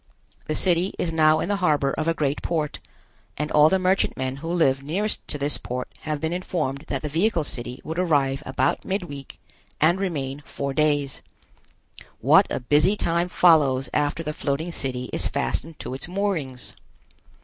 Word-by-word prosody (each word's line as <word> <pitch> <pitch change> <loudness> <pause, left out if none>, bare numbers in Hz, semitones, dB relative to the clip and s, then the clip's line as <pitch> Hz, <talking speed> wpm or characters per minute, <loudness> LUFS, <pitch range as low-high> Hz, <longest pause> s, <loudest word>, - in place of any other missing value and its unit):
The 155 - -1
city 180 +2 +2
is 165 -2 -1
now 155 -1 +4
in - - -2
the 205 0 0
harbor 150 -7 +2
of 155 - -2
a 165 - +2
great 145 -2 -1
port, 155 -3 -2 0.6
and 150 +1 -2
all 150 +1 +6
the 190 - +3
merchantmen 180 -8 0
who 165 +4 -5
live 135 -6 +2
nearest 190 +10 -1
to - - -3
this 145 +1 -1
port 125 0 -4
have 155 -1 -3
been 160 +2 -2
informed 155 -6 -2
that 135 0 -3
the - - -1
vehicle 165 +3 +1
city 125 -3 -4
would 160 +2 -4
arrive 140 -6 +2
about 130 +1 0
midweek 175 -9 -5 0.4
and 170 +5 +4
remain 145 -8 -2
four 140 -1 -4
days. 145 -2 +1 1.0
What - - +5
a - - -2
busy 150 +10 +3
time 170 0 0
follows 145 -8 +4
after 150 +2 0
the 150 -1 -3
floating 150 +4 -2
city 125 -5 -3
is - - 0
fastened 150 - -2
to - - -6
its 135 +3 -5
moorings! 175 -10 -2
150 Hz, 170 wpm, -24 LUFS, 135-170 Hz, 1.0 s, all